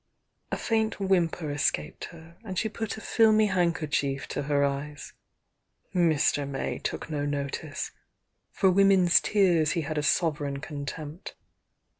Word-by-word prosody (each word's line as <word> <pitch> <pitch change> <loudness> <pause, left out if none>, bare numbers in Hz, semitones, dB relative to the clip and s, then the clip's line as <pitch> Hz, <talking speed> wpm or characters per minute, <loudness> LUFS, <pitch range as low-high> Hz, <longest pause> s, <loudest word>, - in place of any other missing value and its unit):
A - - -1
faint 220 -2 0
whimper 175 -5 +1
escaped 75 - -1
her, 165 0 -13
and 190 -4 -6
she 220 - +1
put 220 0 -4
a - - -8
filmy 220 -1 +4
handkerchief 160 -7 0
to - - -2
her 145 0 +1
eyes. 140 +1 -4 0.8
Mr. 155 -5 +2
May 135 - -3
took - - -4
no 145 -1 -1
notice. 145 +1 -3 0.6
For 190 -1 +3
women's 190 -2 +5
tears 175 -7 +3
he 170 - 0
had 155 0 -2
a - - 0
sovereign 150 -3 0
contempt. 150 +3 -7
160 Hz, 135 wpm, -27 LUFS, 145-190 Hz, 0.8 s, women's